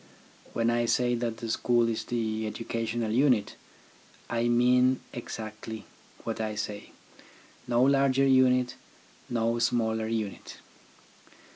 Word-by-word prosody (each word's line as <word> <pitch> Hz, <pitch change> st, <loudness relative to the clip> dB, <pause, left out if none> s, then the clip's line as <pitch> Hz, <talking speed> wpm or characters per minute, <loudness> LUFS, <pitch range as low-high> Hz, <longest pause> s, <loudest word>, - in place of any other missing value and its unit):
When 115 Hz, 0 st, +1 dB
I 120 Hz, 0 st, +1 dB
say 120 Hz, +1 st, +2 dB
that 115 Hz, -1 st, -2 dB
the 115 Hz, -, -6 dB
school 120 Hz, 0 st, +2 dB
is 115 Hz, -1 st, -2 dB
the 110 Hz, -2 st, -2 dB
educational 115 Hz, 0 st, -3 dB
unit, 125 Hz, -2 st, +2 dB, 0.8 s
I 120 Hz, 0 st, +1 dB
mean 125 Hz, +2 st, +4 dB
exactly 110 Hz, -2 st, -7 dB, 0.4 s
what 115 Hz, -1 st, -3 dB
I 110 Hz, -1 st, -2 dB
say, 105 Hz, -1 st, -5 dB, 0.8 s
no 120 Hz, 0 st, +3 dB
larger 135 Hz, 0 st, +4 dB
unit, 125 Hz, -2 st, +4 dB, 0.6 s
no 115 Hz, 0 st, 0 dB
smaller 110 Hz, -2 st, +1 dB
unit. 110 Hz, -3 st, -4 dB
115 Hz, 115 wpm, -28 LUFS, 110-125 Hz, 0.8 s, mean